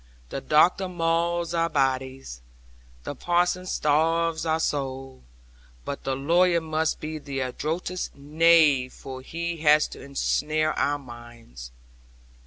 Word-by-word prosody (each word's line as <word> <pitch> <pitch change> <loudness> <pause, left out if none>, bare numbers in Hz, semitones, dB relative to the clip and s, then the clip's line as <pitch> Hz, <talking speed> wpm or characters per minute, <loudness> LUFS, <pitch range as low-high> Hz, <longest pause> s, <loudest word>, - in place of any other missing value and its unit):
The 135 - -5
doctor 175 +7 +3
mauls 170 0 0
our 165 0 +1
bodies; 130 - -2 0.6
the - - -5
parson 175 +4 0
starves 165 +2 +1
our 160 0 +1
souls, 135 -3 -3 0.6
but 140 - -6
the 135 - 0
lawyer 170 +5 +3
must 160 0 -1
be 155 0 -5
the 140 -2 -5
adroitest 160 +8 -3
knave, 150 -3 +3
for 130 -1 -9
he 170 +5 -4
has 150 -1 +4
to - - -10
ensnare 155 +3 0
our 145 0 0
minds. 120 - -12
155 Hz, 120 wpm, -25 LUFS, 135-165 Hz, 0.6 s, has